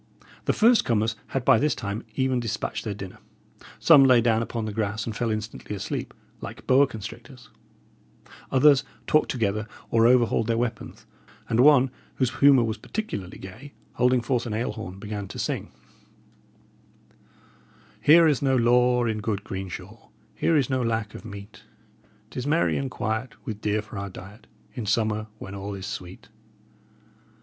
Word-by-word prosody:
The - - +3
first 235 +2 +5
comers 110 -1 0
had 135 -2 -3
by 130 -5 +6
this 150 0 +1
time 100 +3 -4
even 130 -1 +1
despatched 115 -3 -3
their 105 -2 -3
dinner. 95 -2 -9 0.6
Some 140 - +7
lay 130 -2 +6
down 115 -1 +2
upon 115 -1 -3
the 105 - -4
grass 110 0 -2
and 110 - -5
fell 115 +1 -1
instantly 110 -1 -4
asleep, 100 - -5 0.3
like - - -8
boa 135 +2 +5
constrictors; 115 +2 -10 1.0
others 135 +1 +5 0.2
talked 155 - +2
together, 110 -3 -1 0.2
or 115 0 +5
overhauled 120 -3 +3
their 115 -1 +1
weapons: 115 -2 -4 0.4
and 115 - 0
one, 135 -1 +6 0.2
whose 130 -1 -1
humour 140 -3 +6
was 110 -1 -3
particularly 105 - -5
gay, 115 +10 -11 0.2
holding 125 0 +2
forth 120 0 -1
an 110 - -3
ale 115 +3 -1
horn, 105 -5 -7
began 105 0 -5
to - - -9
sing: - - -3 2.3
"Here 165 +3 +7
is 150 -4 +2
no 135 -2 +2
law 125 0 +3
in 110 -2 -1
good 105 -2 -2
green 95 -2 -5
shaw, - - -10 0.2
Here 165 - +2
is 135 -4 +2
no 130 -1 0
lack 115 -2 -1
of - - -9
meat; 100 0 -10 0.7
'Tis 125 +2 -4
merry 160 +3 +2
and 135 -1 -2
quiet, 110 +1 -3
with 110 -5 -5
deer 105 +1 0
for 105 -2 -8
our 100 0 -5
diet, 95 +4 -12 0.3
In 120 -5 -5
summer, 110 0 0
when 95 -2 -9
all 100 0 -5
is 95 -1 -7
sweet. 90 0 -8
115 Hz, 165 wpm, -25 LUFS, 105-130 Hz, 2.3 s, Some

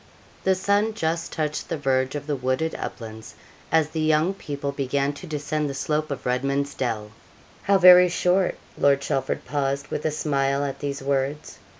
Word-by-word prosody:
The 190 0 +3
sun 205 +3 +1
just 165 -3 -2
touched 150 -1 -3
the 165 - -1
verge 130 -1 0
of 145 -1 -4
the 145 -1 -1
wooded 130 +5 -1
uplands, 110 -2 -7 0.4
as 160 -1 +3
the 160 0 -4
young 155 +4 +2
people 145 -6 -4
began 140 +1 -1
to 180 +6 -10
descend 150 0 -2
the 140 - -5
slope 155 +2 -1
of 140 - -5
Redman's 140 +3 0
Dell. 110 -4 -3 0.5
'How 200 0 +3
very 180 -1 +8
short!' 180 +2 +1 0.2
Lord 140 -1 +4
Chelford 135 -1 -2
paused, 140 0 -2
with 150 - -3
a - - +1
smile, 140 -2 0
at 140 -1 -4
these 140 -1 -4
words. 140 +2 -2
145 Hz, 175 wpm, -24 LUFS, 135-160 Hz, 0.5 s, very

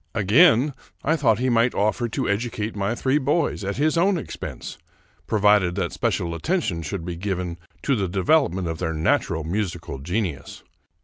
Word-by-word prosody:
Again 125 - +5 0.3
I 155 - +2
thought 120 -9 +2
he 130 +2 0
might 120 +1 +2
offer 110 +4 0
to - - -2
educate 110 +1 -2
my 100 +3 -1
three 135 +4 +1
boys 145 -4 0
at 100 +1 -3
his 155 +3 +2
own 190 +2 +3
expense, 160 - -7 0.5
provided 105 -4 +3
that 95 -4 -2
special 85 -1 -1
attention 85 - -1
should 85 0 -5
be 90 -1 -4
given 90 -2 -3 0.2
to 140 - +2
the 100 -4 -1
development 95 - +1
of 80 -1 -4
their 80 - -2
natural 80 0 0
musical 85 -4 -3
genius. 90 - -4
105 Hz, 165 wpm, -23 LUFS, 90-130 Hz, 0.5 s, Again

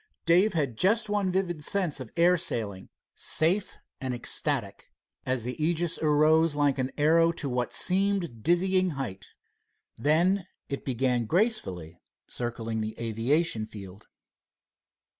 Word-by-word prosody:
Dave 180 +6 +4
had 140 -9 -2
just 215 +3 +2
one 205 -3 0
vivid 175 -4 -2
sense 180 -6 0
of 125 -4 -8
air 175 +2 +5
sailing, 110 - -1 0.2
safe 180 +6 -1 0.2
and 130 -1 -3
ecstatic, 120 -3 -2 0.4
as 130 -3 0
the 125 +2 -3
Aegis 170 +1 0
arose 155 +1 +3
like 145 -2 +1
an 130 0 -1
arrow 165 +3 +4
to 160 -3 -4
what 125 -2 -2
seemed 185 - 0
dizzying 185 - +2
height. 95 -8 -5 0.7
Then 175 - +2 0.2
it 140 - -4
began 125 -2 0
gracefully 95 - -1 0.2
circling 115 -2 -4
the 110 +1 -5
aviation 115 +2 0
field. 100 -1 -11
150 Hz, 125 wpm, -27 LUFS, 120-175 Hz, 0.7 s, air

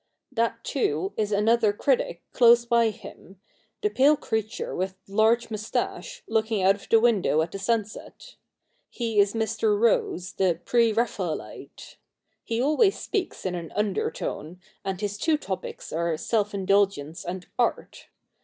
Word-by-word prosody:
That, 230 0 -1
too, 190 - -1
is 210 -1 -1
another 215 +1 +3
critic - - 0
close 235 -1 +6
by 235 -1 +3
him 195 -2 -12 0.2
— - - -42
the 420 - +3
pale 290 +3 +4
creature, 220 -3 -3
with 190 +1 -2
large 225 +3 +2
moustache, 215 +1 -4
looking 220 -2 0
out 190 +1 +6
of 200 - -13
the 225 - +6
window 210 -9 +3
at 165 - -6
the 195 - -6
sunset. 220 - -3 0.6
He 230 -3 -1
is 200 +2 +3
Mr. 410 - 0
Rose, 440 - +1
the 180 -4 +1
pre 235 -2 +3
Raphaelite. 210 -7 -4 0.5
He 230 -1 -2
always 310 - +3
speaks 375 - -3
in 185 - -1
an 170 -2 -6
undertone, 185 -4 -3 0.2
and 190 -2 -3
his 205 0 -3
two 315 +3 +2
topics 195 -10 -6
are 165 0 0
self 205 +4 -1
indulgence 195 -5 +1
and 180 +1 -5
art. 240 - -1
215 Hz, 145 wpm, -26 LUFS, 190-235 Hz, 0.6 s, close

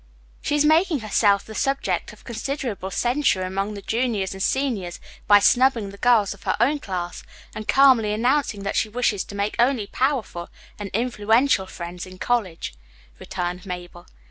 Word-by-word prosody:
"She 290 - 0
is 295 0 +3
making 315 -2 +3
herself 205 -1 +2
the 220 - -9
subject 275 +4 -1
of - - -17
considerable 235 -4 -4
censure 240 0 +1
among 195 +3 -3
the 200 - -8
juniors 220 -5 -1
and 190 - -8
seniors 220 -9 -1 0.3
by 205 - +8
snubbing 235 -1 +3
the 200 - -12
girls 225 -4 +3
of 200 - -17
her - - -1
own 280 +6 +2
class 180 -6 -5 0.3
and 215 0 -7
calmly 260 -6 +5
announcing 230 -1 0
that 200 - -2
she 220 - +1
wishes 220 -3 0
to 200 - -10
make 200 +1 -1
only 240 -3 +2
powerful 245 -8 -2 0.3
and 205 -1 -5
influential 225 -1 +2
friends 175 0 -7
in 185 0 -12
college," 185 - -1 0.5
returned 180 0 -4
Mabel. 175 -2 -8
215 Hz, 165 wpm, -23 LUFS, 190-255 Hz, 0.5 s, by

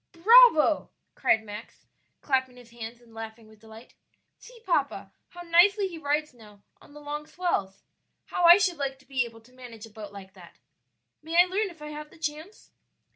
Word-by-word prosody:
"Bravo!" 380 -4 +6 0.2
cried 220 - +1
Max, 210 -1 -11 0.4
clapping 260 -2 -1
his 240 -1 -16
hands 235 0 -9
and 235 -2 -21
laughing 225 0 -9
with 215 -1 -19
delight; 220 +2 -15 0.5
"see, - - -15
papa, - - -1 0.2
how 350 - -11
nicely 380 +4 +4
he 340 -3 -9
rides 300 0 -1
now 210 -4 -18 0.2
on - - -18
the - - -10
long 295 +1 -6
swells! 200 - -3 0.4
How 355 - -1
I 345 +2 +9
should 370 -4 0
like 275 -1 -3
to 265 - -24
be 255 -2 0
able 225 -1 -13
to 245 +3 -23
manage 240 -4 -11
a 225 - -16
boat 210 -1 -10
like 195 -1 -12
that. - - -16 0.6
May 325 +3 0
I 355 - +8
learn 395 +3 -2
if 325 -4 -14
I 300 - -7
have 300 0 -8
the - - -19
chance?" 315 +5 -7
285 Hz, 190 wpm, -26 LUFS, 225-340 Hz, 0.6 s, I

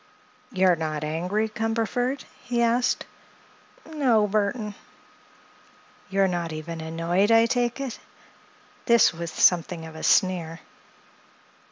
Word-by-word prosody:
"You're 185 -4 +3
not 155 -2 -3
angry, 180 +8 -1
Cumberford?" 225 +4 -2 0.2
he 240 -1 0
asked. 240 +2 +1 0.8
"No, 255 -9 +2
Burthon." 210 +1 -1 1.4
"You're 195 0 +2
not 175 -2 -3
even 160 +1 -6
annoyed, 165 +5 0
I 225 0 +6
take 245 +1 -1
it?" 270 -4 -5 0.9
This 235 -6 +5
with 170 0 -5
something 170 -1 +3
of 160 0 -11
a 160 - -8
sneer. 175 -4 +1
195 Hz, 110 wpm, -25 LUFS, 165-235 Hz, 1.4 s, I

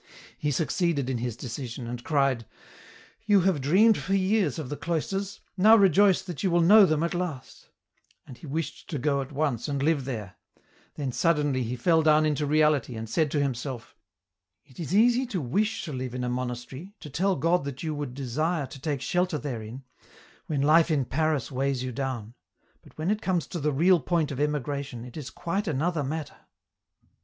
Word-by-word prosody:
He 150 - -2
succeeded 150 -1 0
in 125 - -2
his 120 -1 -3
decision, 120 0 -6
and 120 +1 -6
cried: 135 -6 +1 0.4
" - - -24
You 205 -2 +5
have 175 -5 +1
dreamed 195 - +4
for 195 - -1
years 190 - +1
of 150 -6 -5
the 145 - -3
cloisters, 190 +5 -3 0.2
now 215 +4 +7
rejoice 195 -1 +4
that 180 -2 -6
you 190 - +1
will 175 0 +3
know 200 +4 +7
them 155 -1 +1
at 170 - -1
last," 175 -7 -5 0.6
and 130 - -11
he 155 - -12
wished 160 +3 -4
to 150 - -3
go 140 +1 0
at 135 - -7
once 140 -4 -1
and 140 -2 -2
live 150 -3 +1
there; 110 -8 -6 0.6
then 140 -3 -3
suddenly 145 -3 +1
he 120 +1 -2
fell 160 +6 +3
down 155 0 +4
into 150 -1 0
reality, 150 -4 +2
and 110 0 -5
said 160 -3 +2
to 150 - 0
himself: 130 -2 -4 0.3
" 90 +1 -58
It 125 - -16
is 170 +2 -2
easy 245 +4 +4
to 205 -7 -2
wish 200 - -1
to 155 - -6
live 130 -1 -4
in 125 - -3
a 125 - -1
monastery, 125 - -5
to 150 - -9
tell 190 +6 +1
God 165 +3 +1
that 140 0 -6
you 155 -1 -2
would 145 -4 -5
desire 145 +4 -1
to 135 0 -11
take 145 -3 -2
shelter 180 +1 0
therein, 125 -3 -6 0.6
when 145 -3 0
life 160 +3 +5
in 145 -5 +1
Paris 155 0 -1
weighs 135 -1 -1
you 130 - -3
down, 120 -4 -4 0.5
but - - -20
when 160 +5 0
it 215 0 -1
comes 180 -4 0
to 175 - -5
the 150 0 0
real 170 +6 +4
point 160 +1 0
of 135 - -5
emigration, 140 -4 -2
it 125 - -12
is 145 -5 -6
quite 185 +8 -3
another 160 +1 0
matter." 150 +2 -5
150 Hz, 200 wpm, -27 LUFS, 130-170 Hz, 0.6 s, now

